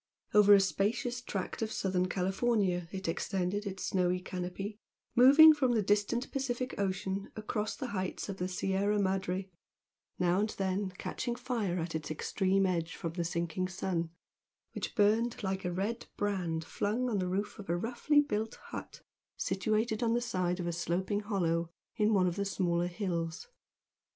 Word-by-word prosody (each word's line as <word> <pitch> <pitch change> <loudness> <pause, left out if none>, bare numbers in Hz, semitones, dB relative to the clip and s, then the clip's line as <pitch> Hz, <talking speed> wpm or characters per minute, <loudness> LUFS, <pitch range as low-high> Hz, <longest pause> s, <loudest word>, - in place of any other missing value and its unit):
Over 205 -1 +8
a - - +6
spacious 225 +6 0
tract 195 -4 -4
of 220 -1 -1
Southern 185 -3 0
California 190 -2 +1
it 190 -2 -5
extended 190 +4 -1
its 195 -1 -4
snowy 180 -1 +1
canopy, 185 +3 -5 0.3
moving 285 +6 +9
from 265 -5 +2
the 220 -3 +2
distant 205 +5 +1
Pacific 260 -1 -2
Ocean 195 0 -2
across 215 0 -2
the 260 - -5
heights 190 -3 -3
of 195 -2 -5
the 180 - -1
Sierra 195 +3 0
Madre, 190 -1 -1 0.7
now 180 +1 +2
and 215 +2 +1
then 190 0 0
catching 240 -1 -3
fire 235 -7 -2
at 165 -1 -3
its 155 -2 -3
extreme 190 +5 +1
edge 170 -3 -1
from 165 -1 -4
the 170 0 -1
sinking 170 +2 -1
sun, 180 -3 -2 0.6
which - - -4
burned 220 +2 +2
like 190 0 -2
a 180 - 0
red 200 +6 -2
brand 175 -6 -1
flung 225 +9 -1
on 215 -5 0
the 185 - -1
roof 200 +4 -2
of 200 - -9
a 170 - +2
roughly 245 +9 +2
built 225 -6 -2
hut - - -8 0.3
situated 215 +3 0
on 230 -1 +2
the - - +3
side 185 -6 -1
of 175 - -2
a 170 - 0
sloping 185 +4 -1
hollow 170 -5 0 0.3
in 215 -1 +2
one 190 -4 +4
of 175 0 -1
the 200 - 0
smaller 175 -3 0
hills. 175 - -3
195 Hz, 165 wpm, -32 LUFS, 180-215 Hz, 0.7 s, moving